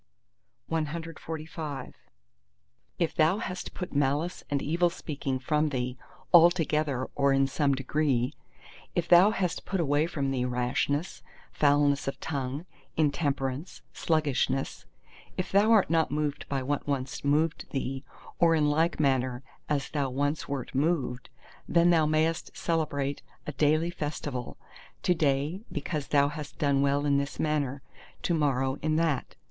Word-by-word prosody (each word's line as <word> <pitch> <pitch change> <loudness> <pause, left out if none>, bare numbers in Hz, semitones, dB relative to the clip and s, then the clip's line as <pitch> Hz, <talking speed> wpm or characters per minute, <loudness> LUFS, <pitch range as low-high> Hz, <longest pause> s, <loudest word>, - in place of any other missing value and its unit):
CXLVI 160 -2 -4 1.0
If 170 - 0
thou 160 +5 +3
hast 185 -4 -5
put 180 - -5
malice 145 +5 0
and 145 -2 +1
evil 170 +5 +2
speaking 140 -5 -4
from 150 +4 +1
thee, 125 -2 -2 0.4
altogether, 155 -6 +4
or 140 -1 +3
in 135 0 +4
some 140 0 +1
degree: 135 -1 0 0.6
if 170 -1 0
thou 175 +4 +7
hast 180 -5 -1
put 195 - -2
away 150 0 +2
from 140 -5 -2
thee 130 -2 0
rashness, 125 +6 -1 0.3
foulness 145 -1 +3
of 135 - -3
tongue, 140 +1 -3 0.3
intemperance, 145 -1 -1
sluggishness: 140 -4 0 0.5
if 185 - -2
thou 205 +3 +4
art 210 -7 +5
not 165 -1 +3
moved 150 -1 -2
by 135 -2 -1
what 145 +2 -2
once 135 -2 -2
moved 150 +3 +1
thee, 135 0 -3 0.4
or 165 -1 +5
in 150 -2 +3
like 160 +3 +1
manner 130 -3 +1 0.3
as 145 -2 -1
thou 140 -3 0
once 145 +4 -1
wert 140 -2 -4
moved—then 155 +3 0
thou 160 -3 +4
mayest 160 +1 0
celebrate 145 -4 -1 0.2
a - - -3
daily 155 +4 +2
festival, 145 -6 -4 0.5
to 180 - +4
day 150 +3 0
because 150 -1 -3
thou 140 -1 +4
hast 150 0 -7
done 140 -2 +2
well 140 +1 +2
in 140 -1 +3
this 140 0 -4
manner, 145 -3 -1 0.4
to 175 - +1
morrow 135 -4 +1
in 155 +1 +1
that. 155 -5 0
145 Hz, 140 wpm, -28 LUFS, 135-160 Hz, 1.0 s, thou